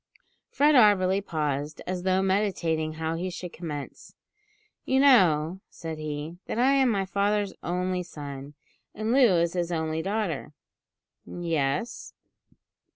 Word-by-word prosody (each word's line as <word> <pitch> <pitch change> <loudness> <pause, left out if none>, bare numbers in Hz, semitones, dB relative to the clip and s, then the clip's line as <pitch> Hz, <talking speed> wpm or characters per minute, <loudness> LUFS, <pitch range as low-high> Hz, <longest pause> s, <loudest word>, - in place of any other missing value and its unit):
Fred 295 +2 +3
Auberly 200 -6 +5
paused, 150 -3 -3
as 180 0 -3
though 190 +1 +1
meditating 180 -5 0
how 160 +1 -3
he 175 +3 -3
should 180 -1 -7
commence. 150 -5 -7 0.7
"You 265 - +1
know," 185 - +4
said 160 -2 -7
he, 155 +3 -5
"that - - -3
I 255 +3 +4
am 270 -2 +4
my 200 -4 0
father's 200 +1 0
only 180 +1 -1
son, 145 -4 -8 0.4
and 215 +2 -2
Loo 245 -8 +5
his 175 0 -3
only 160 -1 -1
daughter." 190 -7 -3 0.7
"Yes." 165 - -2
180 Hz, 125 wpm, -27 LUFS, 155-200 Hz, 0.7 s, Auberly